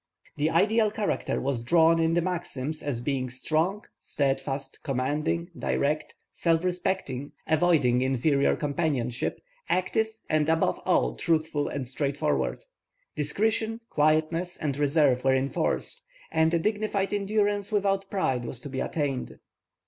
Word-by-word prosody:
The 150 +2 +1
ideal 210 +6 +3
character 210 -1 -1
was 135 -3 -1
drawn 165 +5 +4
in 165 0 +2
the 175 - +2
maxims 160 -5 -3
as 140 -5 -2
being 130 0 -1
strong, 160 +10 -1
steadfast, 135 -1 -2
commanding, 155 +6 -1
direct, 150 +1 -1 0.2
self 165 0 +1
respecting, 175 -7 -2
avoiding 155 -6 +3
inferior 135 +2 +2
companionships, 140 -5 -1 0.3
active, 185 +4 +1 0.2
and 155 0 +1
above 160 0 +2
all 60 0 +2
truthful 155 - 0
and 135 -3 -4
straightforward. 145 - -1 0.5
Discretion, 220 +9 0
quietness, 155 +4 +1
and 145 -4 -2
reserve 145 -3 +3
were 135 0 +4
enforced, 130 0 -1 0.3
and 160 0 +3
a 170 - +3
dignified 205 +1 -1
endurance 205 0 0
without 195 -2 +1
pride 135 -11 0
was 120 0 -4
to 145 - -7
be 130 -1 -4
attained. 140 -5 -2
155 Hz, 125 wpm, -27 LUFS, 135-180 Hz, 0.5 s, drawn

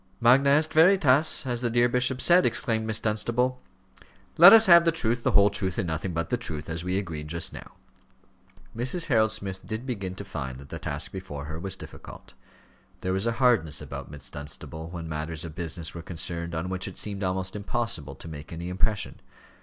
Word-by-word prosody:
"Magna 130 +4 +5
est 155 +3 +3
veritas, 155 -5 +4
as 120 -2 -2
the 120 - 0
dear 120 +1 +3
bishop 125 +1 +1
said," 180 +1 +6
exclaimed 110 -4 -1
Miss 110 0 -1
Dunstable. 120 +4 -1 0.7
"Let 175 +4 +10
us 225 0 +9
have 170 -2 +8
the 165 - +3
truth, 120 -7 -1
the - - 0
whole 100 0 +5
truth, 95 -3 -3
and - - 0
nothing 80 +3 -3
but 85 -1 -3
the - - +2
truth, 80 0 -6
as 80 +1 -3
we 90 +1 -1
agreed 80 -6 -5
just 85 +1 -2
now." - - -10 1.0
Mrs. 130 +9 0
Harold 110 -4 +3
Smith 95 -3 -5
did 110 +3 -5
begin 100 -8 -4
to 100 - -7
find 70 -7 -6
that 70 +1 -13
the - - -6
task 75 -1 -4
before 90 -7 -7
her 80 +1 -6
was 95 +2 -3
difficult. - - -12 0.7
There 95 - -1
was 95 +4 0
a 115 - +1
hardness 115 - +2
about - - -8
Miss 70 -2 -8
Dunstable 75 +3 -8
when 85 -2 -7
matters 80 +1 -5
of 80 - -8
business 85 -1 -4
were 85 - -7
concerned 85 0 -5
on 80 +3 -3
which 95 0 -3
it - - -9
seemed 100 -1 -3
almost 95 0 -2
impossible 105 - -3
to - - -10
make 75 -2 -9
any 85 +1 -6
impression. 95 +3 -1
95 Hz, 200 wpm, -26 LUFS, 80-120 Hz, 1.0 s, Let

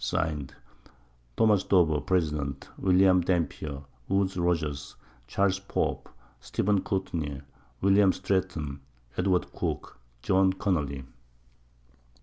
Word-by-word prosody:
_ - - -8
Signed, 75 -4 -2 0.8
Tho. 110 -2 +5
Dover, 80 -6 +4
Pres. 80 -1 +1 0.5
William 95 -1 +5
Dampier, 80 -5 -2 0.3
Woodes 95 0 +1
Rogers, 80 -5 -1 0.3
Cha. 100 +10 +2 0.2
Pope, - - -1 0.3
Steph. 95 +11 0
Courtney, 85 -8 -3 0.4
William 100 0 +5
Stretton, 90 -7 -2 0.4
Edw. 90 0 +3 0.2
Cooke, - - -4 0.2
John 95 0 +3
Connely. 75 -9 -1
90 Hz, 95 wpm, -28 LUFS, 75-95 Hz, 0.8 s, Tho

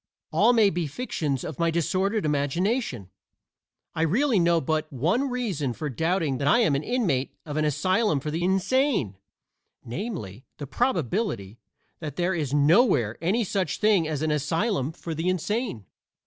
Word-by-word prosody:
All - - +4
may 220 -4 +4
be 170 -1 -2
fictions 145 - -3
of - - -6
my 170 0 +2
disordered 190 +5 0
imagination. 150 - -1 0.8
I - - -2
really 220 - +2
know 170 0 +3
of 160 - -2
but 155 +1 -1
one 180 - 0
reason 200 - -2
for 150 +3 -4
doubting 160 - 0
that 140 - -1
I 145 - +5
am 205 -11 +3
an 140 - +1
inmate 175 - -1
of 150 -2 -6
an 155 0 +1
asylum 185 - +1
for 150 +3 -4
the 165 +3 -2
insane 190 - +1 0.7
namely, 125 - -5
the 145 - -6
probability 170 - -1 0.4
that 150 -4 -6
there 175 +3 0
is 150 -6 -2
nowhere 145 - +3
any 200 +8 +1
such 190 -5 -1
thing 210 -6 +3
as 155 -1 -2
an 155 - +1
asylum 165 - 0
for 165 0 -6
the 165 +3 -1
insane. 185 - -2
165 Hz, 160 wpm, -26 LUFS, 145-205 Hz, 0.8 s, I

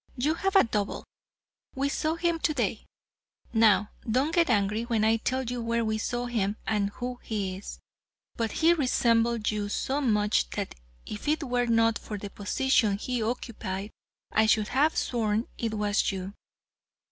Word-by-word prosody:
You 290 +6 +2
have 385 +4 -1
a 390 - +8
double; 210 -4 -2 0.7
we 275 +1 0
saw 310 +3 -1
him 335 0 0
today. 240 - -1 0.7
Now, 210 -3 +4 0.2
don't 265 +8 +1
get 335 -3 +3
angry 210 -1 +2
when 230 -2 0
I 225 +1 +4
tell 260 +3 -1
you 245 0 -3
where 230 0 0
we 220 0 -1
saw 240 +3 -2
him 215 -4 -1
and 205 -2 +1
who 245 +3 -6
he 200 -4 -3
is, 195 - -8 0.6
but 225 -2 -1
he 330 +1 +4
resembled 235 -6 +2
you 210 -1 -2
so 270 +7 -1
much 210 - +2
that - - -3 0.3
if 210 +6 -7
it 310 +1 +1
were 245 -2 0
not 230 -1 +3
for 210 - -6
the 200 0 -7
position 220 -1 +1
he 245 +3 -2
occupied 215 -4 -4 0.4
I 220 0 +3
should 215 -1 +3
have 290 +5 +2
sworn 225 -1 0
it 225 -2 -1
was 210 0 +1
you. 190 0 -5
230 Hz, 165 wpm, -28 LUFS, 210-255 Hz, 0.7 s, a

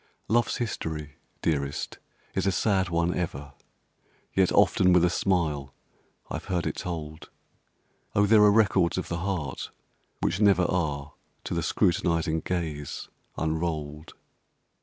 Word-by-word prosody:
Love's 120 +2 +2
history, 80 - -4 0.3
dearest, 70 -3 -1 0.3
is - - 0
a - - +4
sad 95 -1 +1
one 85 +1 +1
ever, 75 -5 -4 0.8
Yet 95 -2 +3
often 90 -1 +4
with 90 -1 +5
a 90 - +2
smile 75 -8 0 0.5
I've - - -5
heard 90 -3 -1
it - - -2
told! 80 -2 -6 0.9
Oh, 100 - +5
there 105 +1 +6
are 105 0 +7
records 100 -5 +3
of 95 - -3
the 85 - -2
heart 85 -7 -3 0.5
which 90 - 0
never 100 -3 +5
Are 75 -5 -1 0.3
to - - -4
the - - 0
scrutinizing 85 -2 +1
gaze 80 -5 -4 0.3
unrolled! 80 -1 -3
85 Hz, 130 wpm, -27 LUFS, 75-95 Hz, 0.9 s, are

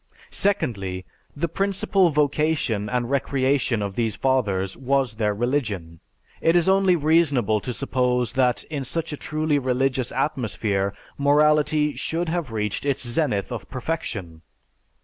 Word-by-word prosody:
Secondly, 105 - -1 0.3
the 160 +4 -1
principal 195 +1 +1
vocation 145 -7 +1
and 125 0 -1
recreation 135 -4 +1
of 100 -1 -3
these 110 -1 -1
Fathers 100 -8 0
was 135 -2 0
their 105 -1 0
religion. 105 - -2 0.4
It 165 +1 +3
is 175 0 +3
only 190 -1 +4
reasonable 145 - +2
to 125 - -4
suppose 125 -2 0
that 125 -2 +2
in 145 -3 -5
such 160 +4 -3
a - - -2
truly 155 -1 0
religious 130 -1 0
atmosphere 105 -7 -1 0.2
morality 150 +1 +3
should 165 +1 -2
have 170 -5 -2
reached 105 -2 -2
its 140 -2 -1
zenith 120 -6 0
of 120 - -6
perfection. 110 - -4
130 Hz, 130 wpm, -24 LUFS, 110-150 Hz, 0.4 s, only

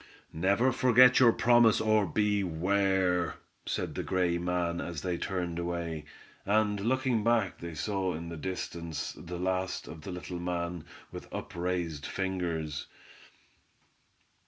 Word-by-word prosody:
"Never 100 +10 +2
forget 125 0 +6
your 120 -3 +7
promise, 115 -1 +5
or 110 -2 +3
beware!" 95 -1 +1 0.3
said - - -2
the - - -3
gray 90 -2 0
man, 85 -1 -1
as 85 -4 -5
they 90 -1 -1
turned 90 -3 -2
away, 85 -3 -3 0.4
and 105 0 +2
looking 125 +1 +1
back 115 -4 +1
they 85 -1 -7
saw 95 0 -1
in 85 +1 -6
the 85 - -6
distance 85 -1 -4
the 90 +1 -7
last 95 +1 -2
of 80 - -9
the 90 - -8
little 90 0 -6
man 85 -2 -3 0.3
with - - -9
up - - -6
raised 85 -4 -2
fingers. 85 -6 -3
90 Hz, 135 wpm, -30 LUFS, 85-105 Hz, 0.4 s, your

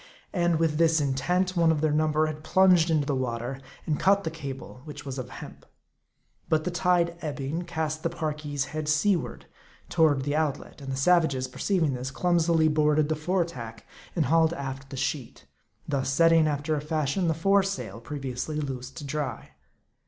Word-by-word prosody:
And 175 -3 +2
with 160 -2 +1
this 165 -1 +4
intent, 175 +7 0
one 165 -2 +4
of 155 - 0
their 155 0 +1
number 155 0 +2
had 155 -1 -5
plunged 180 -1 +4
into 155 -3 +2
the 140 -1 0
water, 125 +1 -3 0.2
and 150 -2 -1
cut 200 +1 +4
the 160 - -3
cable, 135 -5 -8
which 150 -1 -9
was 135 -1 -5
of 125 - -6
hemp. - - -10 0.9
But 155 -1 +2
the 180 - -2
tide 175 -1 +2
ebbing, 150 +2 -3
cast 160 -2 -3
the 165 - 0
Parki's 150 -4 -3
head 155 -1 -2
seaward 170 +4 +1 0.4
toward 155 -5 +3
the 145 +2 -1
out 150 -3 +1
let; - - -14
and 135 -1 -5
the - - -2
savages, 140 -3 +3
perceiving 160 +2 0
this, 125 +1 -4
clumsily 165 +1 +2
boarded 150 0 +2
the 155 - +1
fore 175 +3 0
tack, 115 -8 -9 0.3
and 165 -4 +2
hauled 160 +4 +3
aft 135 -3 -6
the 135 - -7
sheet; 130 0 -3 0.4
thus 140 -3 -1
setting, 165 +2 +5
after 150 +1 -1
a 145 - -2
fashion, 155 +3 -1
the 160 - +1
fore 195 +5 +4
sail, 190 - -4
previously 140 +2 -4
loosed 130 -3 -5
to - - -6
dry. 140 - -4
155 Hz, 180 wpm, -27 LUFS, 140-165 Hz, 0.9 s, setting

